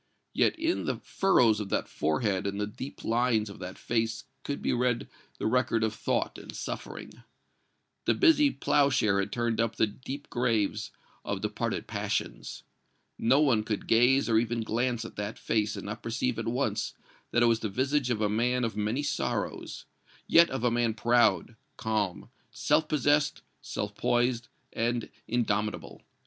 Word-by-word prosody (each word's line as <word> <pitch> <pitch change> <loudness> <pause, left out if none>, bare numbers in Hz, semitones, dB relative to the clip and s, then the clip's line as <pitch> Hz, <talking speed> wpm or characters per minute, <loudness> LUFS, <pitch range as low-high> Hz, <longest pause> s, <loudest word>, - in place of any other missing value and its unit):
Yet - - +2
in 330 +2 0
the - - 0
furrows 120 - +3
of 105 -2 -4
that - - 0
forehead 95 +5 0
and 100 +1 -3
the 105 - 0
deep 120 +6 -8
lines 115 -3 +1
of 100 - -12
that 90 0 -7
face 115 -1 -1 0.2
could 140 - -3
be - - 0
read 120 -1 0 0.3
the - - -4
record 115 -1 +2
of 110 -1 0
thought - - -1
and - - -10
suffering. - - -7 0.8
The - - +3
busy 310 -5 +5
plowshare 135 - +2
had 100 +1 -2
turned 120 -1 0
up 115 -1 -1
the - - +3
deep 130 +6 -7
graves 110 -4 0 0.3
of - - -3
departed - - -2
passions. - - -3 0.6
No 130 +6 +4
one 125 -8 +3
could 105 -2 -3
gaze 125 +4 +4
or 110 -2 +4
even 115 0 -1
glance 120 +1 -1
at - - -10
that 105 +1 -4
face 105 -1 0
and - - -7
not 105 +1 -5
perceive 115 +1 -1
at 115 - -3
once 125 +4 -1 0.3
that 120 - +3
it - - +6
was 115 -1 +3
the 110 - -3
visage 130 +5 0
of 110 -3 0
a 105 - +3
man 120 +4 +1
of 115 -2 -2
many 105 +7 -1
sorrows 145 -2 -3 0.4
yet 170 0 +6
of 135 -3 -4
a 120 - +3
man 120 -2 +1
proud, 115 -1 +3 0.2
calm, 105 0 -2 0.2
self 145 +7 +1
possessed, 150 0 +2 0.2
self - - -4
poised 120 -1 +1 0.3
and 120 0 -1 0.2
indomitable. 105 -3 -1
115 Hz, 165 wpm, -29 LUFS, 110-125 Hz, 0.8 s, it